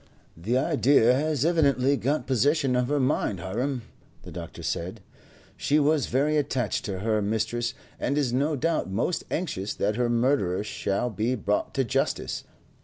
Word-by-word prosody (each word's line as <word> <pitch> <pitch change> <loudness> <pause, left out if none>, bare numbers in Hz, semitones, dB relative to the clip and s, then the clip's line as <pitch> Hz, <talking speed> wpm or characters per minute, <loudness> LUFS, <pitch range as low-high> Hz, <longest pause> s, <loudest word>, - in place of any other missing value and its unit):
"The 110 +10 -1
idea 135 -4 +4
has 150 +1 0
evidently 140 -5 +3
got 140 0 -1
possession 135 +1 +2
of 125 0 +1
her 145 +1 +1
mind, 125 -7 0
Hiram," 120 +8 -2 0.4
the - - -10
doctor - - -8
said. - - -3 0.6
"She 145 - +1
was 150 -2 +2
very 145 +4 +1
attached 130 -6 -1
to 95 -3 -4
her 110 0 +1
mistress, 115 +4 -1 0.2
and 140 - 0
is 135 -5 +1
no 145 +4 +1
doubt 160 - 0
most 115 - -1
anxious 110 - -3
that 105 +2 0
her 120 -1 +1
murderer 120 -6 +1
shall 105 +2 -2
be 115 +4 0
brought 105 -2 -1
to 135 - +2
justice. 115 - -1
125 Hz, 160 wpm, -26 LUFS, 110-145 Hz, 0.6 s, idea